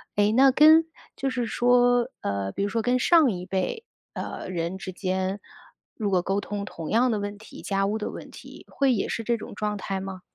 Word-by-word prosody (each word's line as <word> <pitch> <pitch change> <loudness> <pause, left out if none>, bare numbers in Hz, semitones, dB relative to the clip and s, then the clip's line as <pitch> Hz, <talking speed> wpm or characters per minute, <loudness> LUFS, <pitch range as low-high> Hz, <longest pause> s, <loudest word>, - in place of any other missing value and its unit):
诶， 205 +1 +3
那 265 +3 +6
跟 315 +4 +7 0.3
就 270 - -2
是 250 -2 -2
说， 245 +1 +3
呃， 100 -1 -2
比 195 - -3
如 200 - 0
说 225 +2 -1
跟 250 +3 +1
上 320 -3 +5
一 180 -2 -5
辈， 195 - -3 0.3
呃， - - -6
人 170 +1 -3
之 190 - -7
间， 190 +1 -2 0.6
如 210 -3 -2
果 185 -2 +2
沟 195 +3 -1
通 200 0 -5
同 165 -5 -7
样 245 +3 +3
的 215 - 0
问 205 0 -5
题， 220 - -12
家 195 -1 0
务 210 +2 -1
的 210 - -4
问 - - -9
题， - - -13
会 275 -2 +1
也 210 - -1
是 230 - -3
这 235 +1 0
种 215 - -9
状 210 -1 -2
态 195 0 -4
吗？ 190 -1 -7
210 Hz, 230 characters per minute, -25 LUFS, 190-245 Hz, 0.6 s, 跟